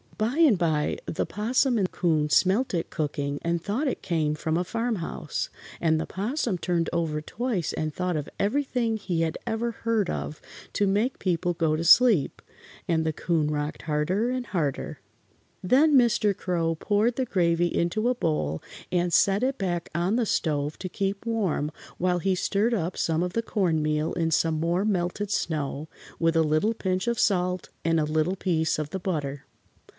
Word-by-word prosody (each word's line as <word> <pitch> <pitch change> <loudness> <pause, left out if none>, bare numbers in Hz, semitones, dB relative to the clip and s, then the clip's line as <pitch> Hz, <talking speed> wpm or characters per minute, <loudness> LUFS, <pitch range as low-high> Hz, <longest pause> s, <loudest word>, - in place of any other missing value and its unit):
By 225 +6 0
and 305 - +5
by 155 -3 0
the - - -1
'Possum 240 +4 +1
and 185 -2 0
'Coon 155 -4 +1
smelt 195 - +3
it 165 - -2
cooking 145 -2 -2
and 170 0 0
thought 240 - -1
it 260 - -3
came 155 -4 0
from 160 +1 -2
a 175 - +1
farm 230 +5 -1
house, 165 -2 -4 0.3
and 160 -2 +2
the - - -2
'Possum 215 - -2
turned 170 -1 0
over 160 -3 -1
twice 215 - -2
and 155 -1 -2
thought 180 0 -1
of 150 -1 -3
everything 235 0 0
he 180 -5 -2
had 160 -1 -1
ever 230 +1 -1
heard 225 -4 -1
of 150 - -5 0.3
to 205 - +2
make 210 +7 +1
people 175 -1 0
go 160 -2 +1
to 160 - -2
sleep, 200 - +5 0.5
and 160 -2 +2
the 160 - 0
'Coon 155 -2 0
rocked 150 0 -3
harder 170 +9 0
and 255 -1 -3
harder. 150 -8 -2 0.6
Then 280 - +4
Mr. 235 -5 +3
Crow 165 -3 0
poured 210 +7 +1
the 260 - 0
gravy 175 -5 +2
into 215 +8 +1
a 250 - +1
bowl 150 - -1 0.3
and 175 -1 +1
set 195 +4 +4
it 270 +1 0
back 175 -3 -2
on 175 +6 +1
the 240 - +2
stove 150 -4 0
to 185 - -4
keep 195 +3 -2
warm 190 -10 0 0.3
while 180 0 +1
he 190 +2 +1
stirred 205 +5 +1
up 180 -3 -2
some 165 0 +1
of 180 0 -3
the 230 - 0
cornmeal 155 -7 0
in 165 -1 0
some 160 0 +2
more 170 +4 +1
melted 195 0 -1
snow, 150 -5 -2 0.3
with 165 0 +2
a 165 - +4
little 155 +9 +2
pinch 185 -1 -1
of 235 -1 0
salt 180 -2 +1 0.2
and 165 -1 +3
a - - +2
little 155 +4 0
piece 165 -4 0
of 150 -1 -4
the 190 - -3
butter. 145 -7 -3
180 Hz, 180 wpm, -26 LUFS, 160-210 Hz, 0.6 s, and